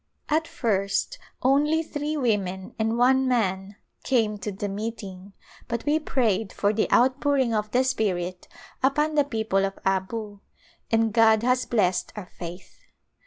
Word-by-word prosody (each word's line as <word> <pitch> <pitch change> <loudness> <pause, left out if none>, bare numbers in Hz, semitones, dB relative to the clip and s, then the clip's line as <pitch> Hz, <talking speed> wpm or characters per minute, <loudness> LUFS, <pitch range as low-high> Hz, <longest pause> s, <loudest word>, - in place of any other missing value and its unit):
At 320 +1 +1
first 210 - -1 0.2
only 295 +5 +3
three 300 0 -3
women 195 -7 -1
and 225 +1 0
one 260 +2 +4
man 200 -5 0 0.3
came 220 -5 +1
to 210 - -4
the 200 +1 -4
meeting, 200 -2 -6 0.3
but 235 -2 -3
we 300 +2 +2
prayed 225 -9 0
for 205 +1 0
the 215 - 0
outpouring 260 0 +3
of 210 -1 -1
the 250 +4 +2
Spirit 185 -7 -2 0.3
upon 295 +4 +2
the 295 -1 +4
people 220 -7 0
of 195 0 -2
Abu 200 +2 -2 0.5
and 225 -1 +2
God 220 -1 +5
has 250 +1 +1
blessed 185 -6 +1
our 210 -3 -6
faith. 180 +1 -10
225 Hz, 145 wpm, -25 LUFS, 195-260 Hz, 0.5 s, God